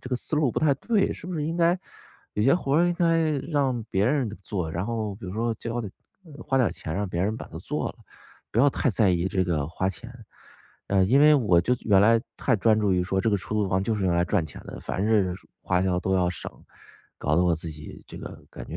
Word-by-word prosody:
这 125 Hz, -, -9 dB
个 125 Hz, -, +1 dB
思 155 Hz, -, -2 dB
路 150 Hz, -4 st, +2 dB
不 -, -, -1 dB
太 145 Hz, -3 st, +3 dB
对？ 205 Hz, -, +1 dB
是 -, -, -10 dB
不 180 Hz, -, -5 dB
是 150 Hz, -, -2 dB
应 165 Hz, +2 st, -2 dB
该 175 Hz, +1 st, +3 dB, 0.6 s
有 105 Hz, -, 0 dB
些 135 Hz, -, +5 dB
活 140 Hz, -5 st, -1 dB
儿 170 Hz, -, +5 dB
应 175 Hz, -, +1 dB
该 165 Hz, -2 st, +2 dB, 0.2 s
让 135 Hz, -6 st, 0 dB
别 95 Hz, +2 st, +1 dB
人 135 Hz, -3 st, +1 dB
做？ 90 Hz, -7 st, -3 dB
然 85 Hz, +4 st, -2 dB
后 110 Hz, -3 st, -3 dB
比 110 Hz, -, -12 dB
如 90 Hz, -, -5 dB
说， 115 Hz, 0 st, -1 dB
叫 115 Hz, +2 st, -4 dB
点 105 Hz, -4 st, -6 dB, 0.4 s
儿 150 Hz, -2 st, -11 dB
花 135 Hz, -2 st, 0 dB
点 125 Hz, -, +3 dB
钱 80 Hz, -, -6 dB
让 100 Hz, -1 st, -2 dB
别 85 Hz, 0 st, -2 dB
人 105 Hz, +3 st, 0 dB
把 -, -, -8 dB
它 -, -, -8 dB
做 -, -, -3 dB
了， -, -, -9 dB, 0.6 s
不 115 Hz, -, 0 dB
要 145 Hz, -, +6 dB
太 130 Hz, -, +1 dB
在 100 Hz, 0 st, +3 dB
意 90 Hz, +1 st, 0 dB
这 95 Hz, -2 st, 0 dB
个 75 Hz, -5 st, -1 dB
花 95 Hz, +2 st, -1 dB
钱。 120 Hz, +4 st, -8 dB, 0.8 s
呃， 95 Hz, -1 st, +3 dB
因 130 Hz, +8 st, +4 dB
为 150 Hz, 0 st, +7 dB
我 105 Hz, -11 st, +3 dB
就 125 Hz, -, +1 dB
原 100 Hz, -3 st, +5 dB
来 115 Hz, +1 st, +5 dB, 0.2 s
太 125 Hz, -, +1 dB
专 110 Hz, +2 st, +3 dB
注 105 Hz, -3 st, +2 dB
于 90 Hz, 0 st, +2 dB
说 95 Hz, +1 st, -1 dB
这 115 Hz, -, +1 dB
个 100 Hz, -, +2 dB
出 105 Hz, +3 st, -6 dB
租 105 Hz, -2 st, +1 dB
房 95 Hz, +1 st, +1 dB
就 110 Hz, -, 0 dB
是 100 Hz, -2 st, -2 dB
用 90 Hz, -, +2 dB
来 85 Hz, -, +3 dB
赚 85 Hz, -, 0 dB
钱 -, -, -11 dB
的， -, -, -8 dB
凡 95 Hz, -, -3 dB
是， 100 Hz, -5 st, +2 dB, 0.3 s
花 90 Hz, 0 st, +1 dB
销 90 Hz, -2 st, +1 dB
都 95 Hz, +2 st, 0 dB
要 90 Hz, -1 st, +2 dB
省， 90 Hz, -, -7 dB, 0.7 s
搞 75 Hz, -, 0 dB
得 90 Hz, -, +4 dB
我 85 Hz, -2 st, +3 dB
自 80 Hz, +1 st, -5 dB
己 75 Hz, 0 st, -11 dB
这 -, -, -10 dB
个 -, -, -10 dB
感 -, -, -9 dB
觉 -, -, -5 dB
110 Hz, 285 characters per minute, -25 LUFS, 95-135 Hz, 0.8 s, 为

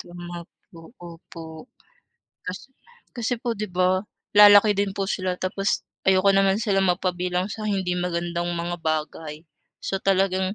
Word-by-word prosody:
Tama 175 Hz, 0 st, -8 dB, 0.3 s
po, 165 Hz, +5 st, -14 dB
opo. 165 Hz, +2 st, -11 dB, 0.8 s
Kasi 185 Hz, +8 st, -7 dB, 0.5 s
kasi 240 Hz, +1 st, -1 dB
po 235 Hz, -2 st, -2 dB
'di 215 Hz, -, -2 dB
ba 185 Hz, +1 st, 0 dB, 0.2 s
lalaki 205 Hz, 0 st, +8 dB
din 200 Hz, -1 st, 0 dB
po 200 Hz, -, -2 dB
sila 185 Hz, -1 st, -1 dB
tapos 195 Hz, +2 st, -2 dB, 0.2 s
ayoko 190 Hz, +1 st, +4 dB
naman 195 Hz, 0 st, +3 dB
sila 200 Hz, -4 st, +1 dB
mapabilang 180 Hz, 0 st, 0 dB
sa 215 Hz, 0 st, -5 dB
hindi 190 Hz, -3 st, -1 dB
magandang 175 Hz, -1 st, -2 dB
mga 170 Hz, +1 st, -3 dB
bagay. 155 Hz, -1 st, -3 dB, 0.4 s
So, 195 Hz, -, -2 dB
talagang 190 Hz, 0 st, +1 dB
185 Hz, 135 wpm, -24 LUFS, 175-195 Hz, 0.8 s, lalaki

